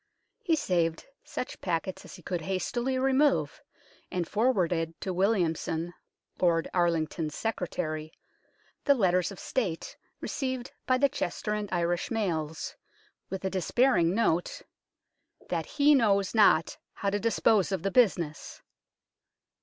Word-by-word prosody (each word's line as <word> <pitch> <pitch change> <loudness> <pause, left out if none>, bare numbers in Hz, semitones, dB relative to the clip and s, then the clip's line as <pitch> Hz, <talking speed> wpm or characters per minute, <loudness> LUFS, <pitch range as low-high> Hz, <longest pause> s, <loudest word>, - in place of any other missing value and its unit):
He 350 -7 +2
saved 170 - 0 0.2
such 295 -4 -6
packets 180 +1 -2
as - - -10
he 180 - -14
could 175 0 -3
hastily 235 +9 -1
remove, 270 +2 +2 0.5
and 175 -2 -2
forwarded 180 -8 +1
to 190 - -2
Williamson, 175 -3 0 0.5
Lord 170 -2 +2
Arlington's 165 -3 0
secretary, 160 -7 -3 0.7
the 280 - +5
letters 185 -5 +2
of 195 - -9
State 190 -11 -2 0.2
received 260 -2 -3 0.2
by 255 - +4
the 280 +2 +4
Chester 210 -5 -3
and 210 -1 -3
Irish 175 0 0
mails, 160 -9 -2 0.5
with 190 0 -5
a 190 - 0
despairing 190 -1 +2
note, 175 -7 0 0.4
" - - -31
that - - -1
he 295 0 +4
knows 200 -7 +3
not 205 -7 +4
how 200 - -2
to 205 - 0
dispose 220 -3 +2
of 190 -4 -2
the 195 - 0
business." 175 -10 +1
190 Hz, 130 wpm, -29 LUFS, 170-230 Hz, 0.7 s, the